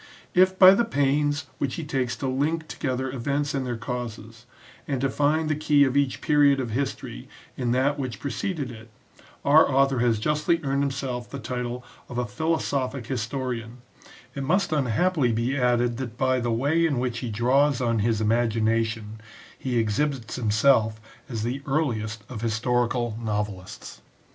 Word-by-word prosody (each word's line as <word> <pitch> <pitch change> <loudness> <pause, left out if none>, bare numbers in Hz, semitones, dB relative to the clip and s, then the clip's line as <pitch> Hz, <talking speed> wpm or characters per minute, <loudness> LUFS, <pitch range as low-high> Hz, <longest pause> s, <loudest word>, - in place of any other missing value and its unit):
If 185 +1 +4
by 185 0 +9
the 235 - +3
pains 145 -5 +1
which 140 -3 -1
he 165 - -4
takes 130 -4 -1
to 135 - -4
link 155 +5 -1
together 130 -1 -3
events 140 +3 -1
and 135 -2 -2
their 120 -1 -3
causes, 115 -1 -6 0.4
and 135 -3 -1
to 135 0 0
find 155 +3 +1
the 155 - +1
key 150 -1 +4
of 135 -1 +1
each 140 -2 +1
period 145 -2 +4
of 120 -4 -3
history 120 - -4 0.3
in 125 -2 -2
that 140 +3 +1
which 125 -7 -4
preceded 145 -2 -3
it, 110 0 -12 0.6
our 150 +3 +6
author 135 -1 +3
has 115 -2 +2
justly 150 +7 +1
earned 140 0 0
himself 135 -3 -3
the 140 - -6
title 125 -1 -4 0.2
of 120 - -6
a 125 - 0
philosophic 135 -1 -1
his 120 -3 -2
torian, 125 -3 -4 0.6
it 140 - -5
must 180 +5 +1
unhappily 145 +1 +1
be 115 +4 0
added 120 -2 +1
that 120 -3 -6
by 130 -1 +2
the 120 -1 -1
way 145 +8 +1
in 155 -5 +1
which 120 -1 -1
he 120 - -4
draws 130 +5 +2
on 115 -3 +1
his 110 0 +1
imagination, 110 -1 0 0.3
he 125 -2 -2
exhibits 115 +1 -1
himself 110 -1 +2 0.3
as 115 -4 -3
the 125 +4 -2
earliest 115 -7 -1
of 120 -5 -7
historical 120 +1 0
novelists. 105 -4 -5
130 Hz, 165 wpm, -25 LUFS, 115-140 Hz, 0.6 s, by